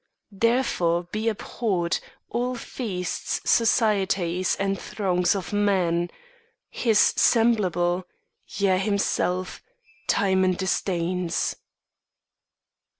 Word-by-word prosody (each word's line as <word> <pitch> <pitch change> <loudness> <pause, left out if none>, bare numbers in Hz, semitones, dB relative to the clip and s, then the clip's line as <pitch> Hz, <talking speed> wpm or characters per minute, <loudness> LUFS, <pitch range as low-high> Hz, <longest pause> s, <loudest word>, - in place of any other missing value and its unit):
Therefore, 195 -6 +1
be 215 +2 0
abhorred 195 -5 -1 0.3
All 245 +1 -2
feasts, 200 -7 -4
societies, 195 -6 +2
and 195 0 -2
throngs 180 -2 0
of 195 +1 -5
men! 180 -4 +1 0.6
His 225 -4 +1 0.2
semblable, 185 -6 +2 0.4
yea, 190 -2 +1
himself, 190 -2 -1 0.5
Timon 190 -1 +2
disdains. 180 -2 -1
190 Hz, 75 wpm, -25 LUFS, 180-215 Hz, 0.6 s, societies